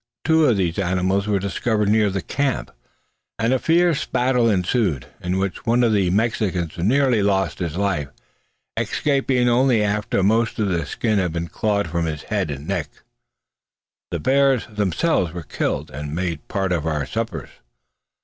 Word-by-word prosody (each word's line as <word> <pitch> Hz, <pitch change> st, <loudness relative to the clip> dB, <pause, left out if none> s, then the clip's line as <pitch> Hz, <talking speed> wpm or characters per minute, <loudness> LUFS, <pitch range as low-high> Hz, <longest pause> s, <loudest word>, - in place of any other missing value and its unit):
Two 160 Hz, -1 st, +4 dB
of 115 Hz, -, +3 dB
these 90 Hz, -1 st, 0 dB
animals 95 Hz, +2 st, 0 dB
were 105 Hz, -1 st, +2 dB
discovered 105 Hz, +2 st, -1 dB
near 105 Hz, -1 st, +3 dB
the 95 Hz, -2 st, -3 dB
camp, 140 Hz, -2 st, -1 dB, 0.7 s
and 115 Hz, +3 st, +1 dB
a 130 Hz, -, +2 dB
fierce 170 Hz, 0 st, +2 dB
battle 125 Hz, -2 st, +1 dB
ensued, 90 Hz, -, 0 dB, 0.2 s
in 90 Hz, +1 st, -1 dB
which 95 Hz, -1 st, -2 dB
one 120 Hz, +2 st, +3 dB
of 115 Hz, -2 st, +3 dB
the 95 Hz, -4 st, +2 dB
Mexicans 95 Hz, -5 st, 0 dB
nearly 125 Hz, +4 st, +3 dB
lost 95 Hz, -1 st, 0 dB
his 85 Hz, -4 st, -3 dB
life, 95 Hz, -8 st, 0 dB, 0.7 s
escaping 135 Hz, -3 st, +1 dB
only 120 Hz, -2 st, +3 dB
after 105 Hz, -1 st, 0 dB
most 115 Hz, +5 st, +2 dB
of 105 Hz, -3 st, 0 dB
the 85 Hz, -5 st, -1 dB
skin 110 Hz, +5 st, 0 dB
had 90 Hz, -3 st, 0 dB
been 85 Hz, 0 st, -3 dB
clawed 100 Hz, -3 st, 0 dB
from 85 Hz, +1 st, -1 dB
his 75 Hz, -2 st, -4 dB
head 100 Hz, -6 st, -2 dB
and 70 Hz, +1 st, -6 dB
neck. 85 Hz, -7 st, -2 dB, 1.2 s
The 85 Hz, -, -3 dB
bears 135 Hz, -, +3 dB
themselves 105 Hz, -, 0 dB
were 85 Hz, -1 st, -6 dB
killed, 75 Hz, -, -3 dB
and 75 Hz, +2 st, -5 dB
made 85 Hz, -4 st, -3 dB
part 95 Hz, -3 st, -1 dB
of 80 Hz, -3 st, 0 dB
our 75 Hz, -3 st, -1 dB
suppers. -, -, -4 dB
100 Hz, 165 wpm, -22 LUFS, 85-115 Hz, 1.2 s, Two